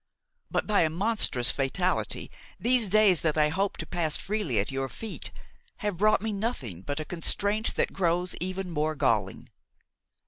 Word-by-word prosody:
But, - - 0
by 210 -1 +3
a 160 - +3
monstrous 170 - +2
fatality, 175 +7 -1 0.3
these 240 -4 +3
days 200 -6 +5
that 155 -1 0
I 150 0 +4
hoped 195 +5 -1
to - - -6
pass 165 -4 -1
freely 200 - -2
at 100 - 0
your 135 0 -2
feet, 220 - -5 0.6
have 205 -4 -1
brought 215 +2 +3
me 220 -1 -1
nothing 175 - -3
but 145 +9 -4
a 155 - -4
constraint 200 +6 0
that - - 0
grows 180 -1 0
ever 185 +1 -2
more 155 -3 -2
galling. 115 -9 0
180 Hz, 165 wpm, -28 LUFS, 150-205 Hz, 0.6 s, days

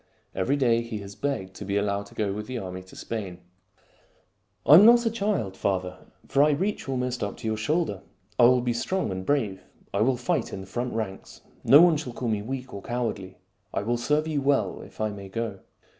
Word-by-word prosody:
Every 105 +9 +1
day 120 -4 +3
he 115 -2 -5
has 100 0 -9
begged 100 -8 -3
to - - -7
be 100 0 -1
allowed 100 0 -1
to - - -17
go 105 -3 -1
with 105 +1 -5
the 130 -1 -4
army 95 -3 -6
to 95 - -16
Spain. 100 -6 -5 0.7
" - - -40
I - - +7
am 175 +6 +10
not 235 +2 +7
a 225 - +2
child, 200 - -1
father; 90 -2 -2 0.3
for 140 - +3
I 150 - +6
reach 185 +2 -1
almost 125 -2 -2
up 100 - -4
to - - -6
your 110 - 0
shoulder. 110 - -1 0.4
I 120 - +8
will 125 +1 +5
be 120 -1 0
strong 185 - -1
and 95 0 -4
brave. 105 -6 0 0.3
I - - +1
will 125 +3 +3
fight 125 - -1
in 95 - -5
the - - -9
front 120 +6 -4
ranks. 105 -4 -5 0.2
No 145 +3 +8
one 170 -3 +6
shall 130 -5 -6
call 120 0 -3
me 105 -2 0
weak 130 +3 -6
or 100 - -6
cowardly. 110 -5 -4 0.4
I - - 0
will 120 +3 0
serve 150 +6 +1
you 150 -3 -1
well 135 -8 +1
if - - -14
I 110 -1 0
may 100 -1 -9
go." 110 -1 -4
115 Hz, 225 wpm, -26 LUFS, 100-135 Hz, 0.7 s, am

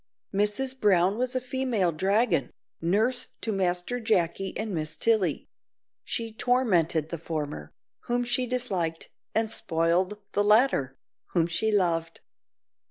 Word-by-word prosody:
Mrs 230 +7 0
Brown 190 -1 +4
was 255 +1 -1
a - - +2
female 255 -7 0
dragon, 190 - +1 0.3
nurse 220 +9 +1
to 225 - -2
Master 185 +4 -1
Jacky 195 -4 0
and 215 -1 -3
Miss 155 -2 -3
Tilly; 215 -9 +1 0.6
she 230 -1 -3
tormented 180 - +1
the 170 - -4
former, 150 -2 -4 0.4
whom 245 0 0
she 250 +1 0
disliked, 190 -10 -1 0.3
and 220 0 +2
spoiled 170 +5 +1
the 205 - +1
latter, 210 - +3 0.4
whom 170 -3 +3
she 170 +6 0
loved. 165 -5 0
200 Hz, 125 wpm, -27 LUFS, 170-240 Hz, 0.6 s, Brown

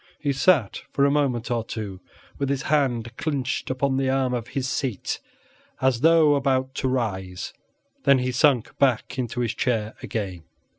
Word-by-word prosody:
He 145 -2 -1
sat 135 - +3
for 140 - +3
a 140 - +3
moment 130 -6 0
or 120 -2 0
two 105 -4 -6 0.4
with 140 -1 0
his 140 -1 -1
hand 125 -6 0
clinched 140 -4 -2
upon 130 +1 0
the 135 -1 +1
arm 130 -1 +1
of 120 -2 -3
his 130 -1 0
seat 130 -5 -2 0.6
as 130 -3 +2
though 160 -1 +6
about 135 -2 +1
to 130 - 0
rise, 95 -8 -2 0.5
then 140 -1 +6
he 125 0 0
sunk 125 -2 +2
back 130 -1 +1
into 125 0 -2
his 115 -2 0
chair 110 -2 -1
again. 95 -9 -4
130 Hz, 165 wpm, -24 LUFS, 115-140 Hz, 0.6 s, though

